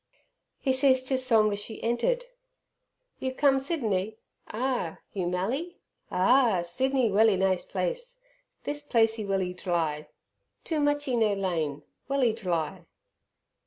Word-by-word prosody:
He 265 - +1
ceased 260 -1 +3
his 260 -1 +1
song 220 -4 +4
as 205 - -3
she 220 +2 -7
entered. 485 - 0 0.9
"You 260 0 -3
come 275 -1 +4
Sydiney? 220 - -1 0.3
Ah! 240 -8 -2 0.2
You 185 -3 -2
mally? 245 - -2 0.3
Ah! 205 -1 +3
Sydiney 255 +6 0
welly 210 0 +4
ni' 190 0 +2
place. - - -4 0.5
This 290 0 -3
placee 225 -6 +1
welly 190 -2 0
dly 165 -4 -2 0.6
too 320 -2 -2
muchee 290 -3 +1
no 220 -3 +3
lain 165 -7 -2 0.2
welly 270 -4 +2
dly." 175 -8 -3
225 Hz, 125 wpm, -28 LUFS, 190-270 Hz, 0.9 s, song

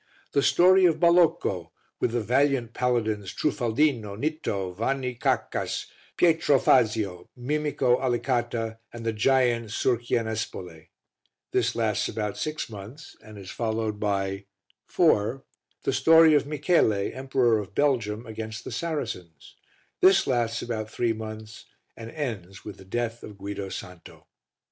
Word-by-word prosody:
The 140 - +2
Story 185 +5 +5
of 160 -3 +3
Balocco 170 - +3 0.3
with 115 - 0
the 120 - 0
valiant 130 0 +1
Paladins 110 -5 -1
Trufaldino, 120 -6 0
Nitto, 105 - -3
Vanni 125 +4 -1
Caccas, 120 - -1 0.3
Pietro 160 -4 +4
Fazio, 110 -8 +2
Mimico 140 -1 0
Alicata 120 -3 -1
and 115 -1 -9
the 115 - 0
giant 120 0 +2
Surchianespole. 110 -8 -2 0.6
This - - +1
lasts - - 0
about 105 -2 -3
six 155 0 -3
months, 115 +8 -11
and 110 -1 -12
is 95 -2 -9
followed 110 -2 -2
by 100 -1 -1 0.4
IV. 110 +6 +2 0.4
The - - 0
Story 160 -1 +6
of 145 -1 +3
Michele, 150 -4 +2 0.2
Emperor 130 -4 +1
of 100 -1 -8
Belgium, 115 -6 0
against 110 0 -6
the - - -7
Saracens. 115 - -5 0.4
This 190 0 +5
lasts 120 -3 0
about 110 -2 -4
three 115 0 0
months 110 0 -8 0.3
and 115 0 -9
ends 105 - -6
with 105 -2 -8
the 95 - -14
death 115 +3 -3
of 105 -2 -10
Guido 100 0 -5
Santo. 90 -3 -10
115 Hz, 130 wpm, -26 LUFS, 105-135 Hz, 0.6 s, Story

